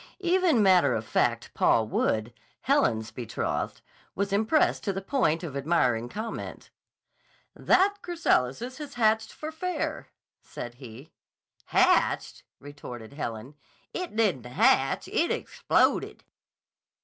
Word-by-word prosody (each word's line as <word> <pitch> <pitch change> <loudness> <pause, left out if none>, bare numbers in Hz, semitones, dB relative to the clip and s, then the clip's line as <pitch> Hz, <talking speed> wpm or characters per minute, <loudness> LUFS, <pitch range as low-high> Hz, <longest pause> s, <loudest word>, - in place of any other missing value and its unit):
Even 350 - +3
matter 185 -2 +4
of 110 0 -3
fact - - 0
Paul 110 -1 +3
Wood, 110 +1 0 0.3
Helen's 115 - +1
betrothed, 115 0 -3 0.3
was 200 +1 -1
impressed 220 +10 +2
to 200 - +1
the 195 - -3
point 190 - 0
of 150 -5 -6
admiring 130 -6 +1
comment. 220 - -6 0.8
"That 400 +2 +3
chrysalis 255 - 0
has 290 -2 -8
hatched 220 -1 +2
for 310 +1 -7
fair," 365 +3 -3 0.3
said 120 - -8
he. 125 +5 -11 0.5
"Hatched!" - - +2 0.2
retorted 125 -5 -10
Helen. 120 -2 -6 0.4
"It 360 -9 -5
didn't 190 - +1
hatch. 135 +1 +2
It 340 - 0
exploded!" - - 0
185 Hz, 115 wpm, -27 LUFS, -, 0.8 s, matter